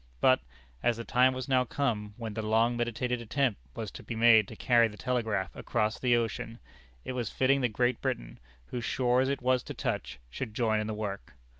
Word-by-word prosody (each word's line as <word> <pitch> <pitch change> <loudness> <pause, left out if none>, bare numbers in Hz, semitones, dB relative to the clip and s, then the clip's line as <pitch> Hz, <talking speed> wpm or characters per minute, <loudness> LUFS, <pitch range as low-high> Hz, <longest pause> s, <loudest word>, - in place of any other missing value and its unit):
But, - - +5 0.4
as 120 - +2
the 115 - -5
time 130 +2 +3
was 130 -1 -4
now 130 -2 +3
come 110 -6 -2
when 115 -3 -5
the 110 - -3
long 110 +2 +2
meditated 120 +1 -1
attempt 120 - 0
was - - -5
to - - -10
be - - -6
made 110 -2 +6
to 110 - -9
carry 115 0 +4
the 105 -1 -11
Telegraph 110 -7 -1
across 110 +2 -1
the 125 -2 +3
ocean, 115 0 -2 0.5
it - - -3
was 125 -2 -2
fitting 135 +1 +2
that 125 - +2
Great 120 +2 +1
Britain, - - -3 0.3
whose 120 - -5
shores 125 +2 +2
it 140 -2 -2
was 130 0 +3
to - - -8
touch, 65 0 -3
should 110 - -5
join 110 -3 +2
in 105 - -2
the 110 - -3
work. 100 -6 -5
120 Hz, 205 wpm, -30 LUFS, 110-125 Hz, 0.5 s, made